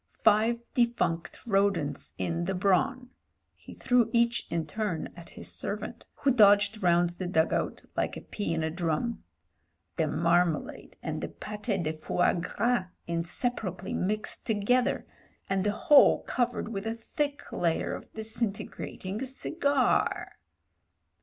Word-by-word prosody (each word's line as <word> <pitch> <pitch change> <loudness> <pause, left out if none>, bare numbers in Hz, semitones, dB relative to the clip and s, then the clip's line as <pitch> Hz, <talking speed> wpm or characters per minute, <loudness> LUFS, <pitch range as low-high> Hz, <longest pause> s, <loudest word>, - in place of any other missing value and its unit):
Five 225 +2 +4
defunct 235 -9 0
rodents 195 - +1
in 170 0 -1
the 190 +1 -1
brawn" 205 +8 +1 0.2
— - - -50
he - - -13
threw 245 -3 +3
each 235 0 +2
in 165 -1 -1
turn 190 -2 -3
at 170 -1 -11
his - - -4
servant, - - -4
who 275 - +2
dodged 205 -2 +5
round 175 -1 +3
the 175 +1 -5
dug 160 -2 +2
out - - -2
like - - -1
a - - -7
pea 205 -5 -4
in 160 - -1
a 160 - -1
drum 175 +7 -1 0.3
— 80 +2 -47
"the 160 - +2
marmalade 170 +1 0
and - - -3
the - - -2
pate 210 -3 -3
de 155 0 -1
fois 160 +3 +1
gras 195 +5 0 0.2
inseparably 180 +4 -2
mixed 210 +3 -1
together, 245 +5 +2 0.4
and 195 -1 0
the 205 - +2
whole 280 +7 +6
cov 245 -1 0
ered - - -4
with 205 -1 -4
a 225 - -1
thick 285 +5 -3
layer 165 -2 0
of - - -8
disintegrating 220 -2 -3
cigar." 275 0 0
200 Hz, 145 wpm, -29 LUFS, 170-235 Hz, 0.4 s, whole